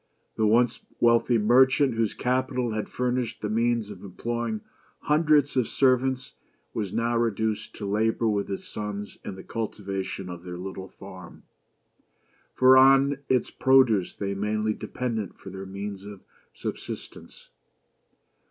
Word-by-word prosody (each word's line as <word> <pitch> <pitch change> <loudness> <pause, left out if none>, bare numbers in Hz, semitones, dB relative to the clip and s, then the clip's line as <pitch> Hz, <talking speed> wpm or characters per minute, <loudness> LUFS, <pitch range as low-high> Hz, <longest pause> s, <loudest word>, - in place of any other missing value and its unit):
The 110 - +2
once 120 +3 +3 0.2
wealthy 115 0 +4
merchant, 130 +4 +4
whose 115 -2 -1
capital 125 -1 0
had 110 -1 -3
furnished 125 -2 -2
the 105 - -1
means 115 -1 +1
of - - -10
employing 115 +3 -3 0.4
hundreds 150 -2 +3
of 125 -3 +2
servants, 130 -1 +1 0.4
was 105 -4 -3
now 115 +2 0
reduced 110 -2 -1
to 105 - -6
labor 110 +3 +1
with 100 -2 0
his 95 - -4
sons 105 -1 -6
in 100 - -6
the 95 - -10
cultivation 100 -4 -4
of 90 -1 -8
their 90 -1 -7
little 95 +1 -6
farm, 95 -2 -12 1.1
for 130 0 +7
on 135 +1 +5
its 130 -1 +1
produce 130 -8 +3
they 100 -1 -3
mainly 105 +2 -1
depended 110 -4 -4
for 95 - -11
their 95 0 -7
means 100 0 -6
of 100 -1 -10 0.3
subsistence. - - -8
110 Hz, 135 wpm, -26 LUFS, 100-125 Hz, 1.1 s, for